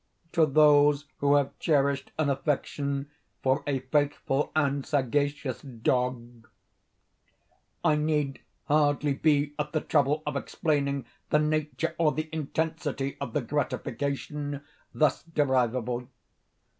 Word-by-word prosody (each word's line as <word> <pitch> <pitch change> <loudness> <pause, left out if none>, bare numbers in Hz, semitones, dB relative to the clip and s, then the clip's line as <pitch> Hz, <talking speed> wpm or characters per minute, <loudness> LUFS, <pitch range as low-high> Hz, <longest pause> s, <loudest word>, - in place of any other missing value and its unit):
To 160 -2 +4
those 145 0 +5
who 140 0 +3
have 140 -2 0
cherished 140 -3 +1
an 155 -3 +2
affection 140 0 -2 0.3
for 130 0 +2
a 135 -3 0
faithful 145 0 0
and 140 -2 +1
sagacious 145 -1 -1
dog, 120 -2 -2 1.4
I 155 -3 +4
need 150 -2 0 0.3
hardly 145 -1 +2
be 145 0 +2
at 150 0 -2
the 155 - +1
trouble 150 +1 +1
of - - -2
explaining 140 -3 -1 0.2
the - - +4
nature 150 0 0
or 155 -3 +3
the 155 0 -3
intensity 155 -2 -2
of 130 -5 -4
the 150 - +1
gratification 140 +2 -3 0.3
thus 150 -4 +2
derivable. 125 -6 0
145 Hz, 115 wpm, -28 LUFS, 135-150 Hz, 1.4 s, those